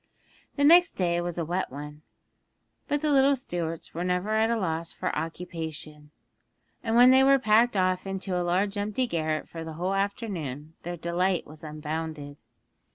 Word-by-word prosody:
The 285 - 0
next 345 +4 +7
day 175 -2 0
was 175 -1 -4
a 170 - -1
wet 180 0 -2
one, 150 +2 -8 0.9
but 290 0 -1
the 305 - +2
little 275 0 +5
Stuarts 170 - -5
were 170 - -3
never 180 +3 -1
at 220 +1 +2
a 235 - +1
loss 165 -4 -2
for - - -3
occupation, 160 -3 -6 0.7
and 225 -1 0
when 245 +2 +8
they 265 +1 +6
were 275 0 +6
packed 225 -1 +3
off 185 0 +1
into 195 -1 -3
a 180 - +1
large 195 +4 0
empty 210 +5 -1
garret 155 -7 -2
for 165 -1 -7
the 160 0 -7
whole 180 +4 -2
afternoon 180 - -3
their 175 +1 -5
delight 175 +2 0
was 155 +1 -13
unbounded. 155 -1 -5
180 Hz, 170 wpm, -27 LUFS, 160-215 Hz, 0.9 s, when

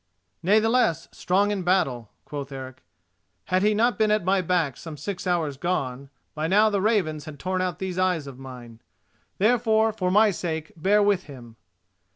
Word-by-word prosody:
"Natheless 215 -3 +2
a - - -22
strong 200 +3 +1
in 200 -2 -2
battle," 160 - 0 0.2
quoth 140 -1 -6
Eric; 130 -1 -8 0.6
"had 185 0 +1
he 210 +1 +3
not 235 +3 +2
been 215 -1 +3
at 210 -4 +1
my 190 0 +2
back 170 -7 0
some 160 -3 -9
six 190 +3 -5
hours 160 -6 0
gone, 140 -5 -3 0.2
by 155 +1 -2
now 210 +4 +4
the 200 -2 0
ravens 180 -8 0
had 155 -2 -9
torn 185 +5 -2
out 180 -2 -2
these 185 -1 -4
eyes 180 -5 +1
of 135 -2 -10
mine. 120 -4 -11 0.6
Therefore, 220 0 +3
for 185 -4 -1
my 210 +3 +5
sake, 160 -3 -4
bear 200 +6 +3
with 200 -2 +1
him." 120 -5 -12
180 Hz, 180 wpm, -25 LUFS, 145-205 Hz, 0.6 s, my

